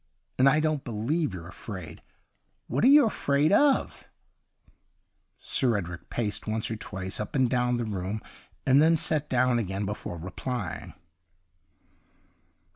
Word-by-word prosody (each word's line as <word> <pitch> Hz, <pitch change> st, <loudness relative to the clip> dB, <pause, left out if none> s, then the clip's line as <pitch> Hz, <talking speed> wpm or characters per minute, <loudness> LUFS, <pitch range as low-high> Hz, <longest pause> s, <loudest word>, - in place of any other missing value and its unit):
And 135 Hz, +1 st, +7 dB
I 150 Hz, +3 st, +3 dB
don't 155 Hz, -2 st, 0 dB
believe 125 Hz, +6 st, -1 dB
you're 85 Hz, -3 st, -8 dB
afraid. 90 Hz, -3 st, -8 dB, 0.6 s
What 130 Hz, +4 st, -1 dB
are -, -, +7 dB
you 285 Hz, +1 st, +8 dB
afraid 145 Hz, -8 st, +1 dB
of 280 Hz, +4 st, +2 dB, 0.6 s
.^' -, -, -30 dB, 0.6 s
Sir 120 Hz, -5 st, +1 dB
Edric 90 Hz, -3 st, -6 dB
paced 110 Hz, -3 st, -3 dB
once 110 Hz, +1 st, -2 dB
or -, -, -1 dB
twice 95 Hz, -3 st, -5 dB
up 105 Hz, -, -5 dB
and 130 Hz, -2 st, +3 dB
down 125 Hz, 0 st, +1 dB
the 120 Hz, -, -2 dB
room, 100 Hz, 0 st, -3 dB, 0.5 s
and 135 Hz, +2 st, +5 dB
then 165 Hz, +1 st, +5 dB
sat 150 Hz, -1 st, 0 dB
down 125 Hz, -1 st, +2 dB
again 100 Hz, -1 st, -3 dB
before 100 Hz, -3 st, -5 dB
replying. 95 Hz, -, -5 dB
120 Hz, 140 wpm, -27 LUFS, 100-140 Hz, 0.6 s, you